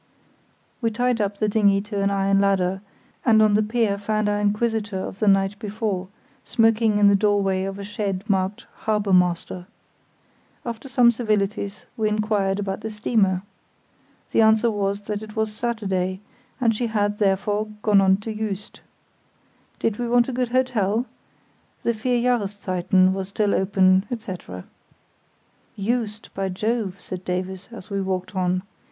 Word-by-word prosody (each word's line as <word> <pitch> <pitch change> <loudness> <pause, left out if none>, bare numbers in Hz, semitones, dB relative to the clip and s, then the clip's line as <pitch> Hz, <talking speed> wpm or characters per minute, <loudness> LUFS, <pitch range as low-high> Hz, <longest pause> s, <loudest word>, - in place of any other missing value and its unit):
We 230 - +2
tied 245 +1 0
up 200 0 -1
the 215 - +1
dinghy 205 -2 +3
to 205 -1 -4
an 200 - +2
iron 195 0 +2
ladder, 190 -1 +1 0.4
and 225 -3 +5
on 215 -1 +5
the 210 - +4
pier 215 -2 0
found 215 +1 0
our 205 0 +1
inquisitor 210 -1 0
of 190 +1 -5
the 215 - +1
night 195 +1 +3
before 210 -3 -3 0.4
smoking 225 -2 +3
in 205 -1 +5
the 200 - +6
doorway 195 -2 +1
of 195 0 -5
a 200 - -6
shed 200 -2 -3
marked 195 -1 0 0.2
"Harbour 210 -2 +1
Master". 180 0 +1 1.0
After 235 +2 -6
some 240 -1 +5
civilities 210 -3 -2
we 215 -1 +1
inquired 210 -2 0
about 195 0 -3
the 220 - -4
steamer. 210 -3 +1 0.9
The - - +4
answer 220 +1 +4
was 200 -1 -1
that 205 0 -4
it 215 -1 -10
was 220 -1 -1
Saturday, 195 -5 -2 0.4
and 230 -3 +2
she 235 +2 -1
had, 205 -2 0
therefore, 205 +1 +1 0.2
gone 205 -2 +5
on 190 0 +4
to 220 +1 -4
Juist. 210 -2 -5 1.0
Did 225 -1 -1
we 240 -1 -2
want 240 0 +4
a 265 - -3
good 250 -1 -1
hotel? 240 -3 +1 0.8
The 235 - +2
"Vier 240 +2 0
Jahreszeiten" 190 -2 +1
was 190 0 -4
still 205 0 +1
open, 190 0 +3
etc. 185 - -6 1.1
"Juist, 215 0 -2
by 195 0 -2
Jove!" 205 0 -2
said 185 0 -7
Davies, 185 +1 -4
as 215 -3 -11
we 200 0 -1
walked 185 0 -3
on. 185 0 0
205 Hz, 155 wpm, -23 LUFS, 195-220 Hz, 1.1 s, the